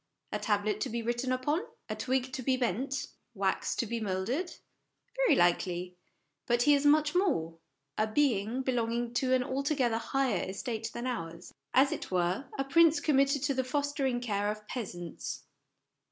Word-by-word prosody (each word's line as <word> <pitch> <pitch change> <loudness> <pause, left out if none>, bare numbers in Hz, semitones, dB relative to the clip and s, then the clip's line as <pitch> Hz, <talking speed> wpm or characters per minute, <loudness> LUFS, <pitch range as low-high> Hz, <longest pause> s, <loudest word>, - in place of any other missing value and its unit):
A - - -1
tablet 210 -1 0
to - - -1
be 235 +1 -3
written 240 +2 -1
upon? 290 +6 0 0.3
A - - -3
twig 260 0 -1
to 260 - -3
be 255 +1 +1
bent? 255 +4 -1 0.3
Wax 195 -1 0
to - - 0
be 235 +1 -3
moulded? 220 - -2 0.6
Very - - +4
likely; 175 +1 +1 0.5
but 240 0 +3
he 295 - +6
is 285 0 +3
much 295 0 +4
more 165 - +1 0.4
a 215 - +3
being 235 -1 +1
belong 240 -3 0
ing 240 0 -2
to 255 +1 +1
an 255 -1 +4
altogether 260 -3 0
higher 270 -2 0
estate 225 +3 -4
than 240 - -5
ours; 170 -8 -5 0.2
as 270 +2 +5
it - - -4
were, 185 +8 0
a 270 - +1
prince 325 +3 +5
committed 275 -1 +2
to 285 -1 +1
the 260 0 0
fostering 275 -1 -1
care 205 -3 0
of 210 0 -5
peasants. 175 -9 -5
245 Hz, 170 wpm, -31 LUFS, 210-275 Hz, 0.6 s, he